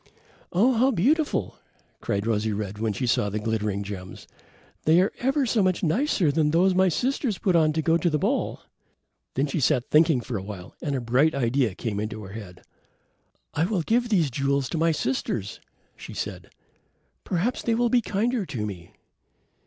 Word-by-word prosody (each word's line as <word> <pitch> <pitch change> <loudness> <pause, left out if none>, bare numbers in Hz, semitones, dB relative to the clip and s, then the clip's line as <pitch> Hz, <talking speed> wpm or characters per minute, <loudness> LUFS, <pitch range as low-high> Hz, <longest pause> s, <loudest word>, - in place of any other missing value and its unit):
"Oh, 220 +9 +3
how 250 +3 +3
beautiful," 270 - +1 0.4
cried 100 +1 -2
Rosy 110 -1 0
red 105 0 -4
when 110 0 0
she 105 +5 -2
saw 105 -3 +1
the 105 - -3
glittering 105 -2 -1
gems. 95 -2 -8 0.6
"They 160 +3 +5
are 190 - +2
ever 270 +2 +1
so 225 -2 +2
much 185 -2 +1
nicer 185 - +2
than 150 0 +2
those 180 +4 +3
my 185 0 +4
sisters 250 - -1
put 185 -3 +1
on 155 -2 +4
to 160 0 -1
go 165 +1 +3
to 175 - +1
the 155 - +1
ball." - - -1 0.7
Then 135 - +2
she 150 +2 -2
sat 130 -2 +1
thinking 155 -3 +5
for 120 -1 -4
a - - -4
while 95 -2 -9
and 145 -4 -2
a 130 - -2
bright 130 +7 +2
idea 120 -5 +1
came 105 -3 -3
into 110 0 -4
her 95 0 -9
head. 100 -5 -10 0.9
"I 160 - +1
will 185 -3 -1
give 240 +6 +1
these 170 - +2
jewels 140 0 0
to - - -3
my 165 0 +3
sisters," 125 -8 -2 0.4
she - - -10
said. - - -5 0.7
"Perhaps 195 +8 -1
they 230 - +1
will 240 +1 +2
be 245 +1 +3
kinder 225 +2 0
to 120 - -4
me." 95 -1 -8
150 Hz, 185 wpm, -25 LUFS, -, 0.9 s, They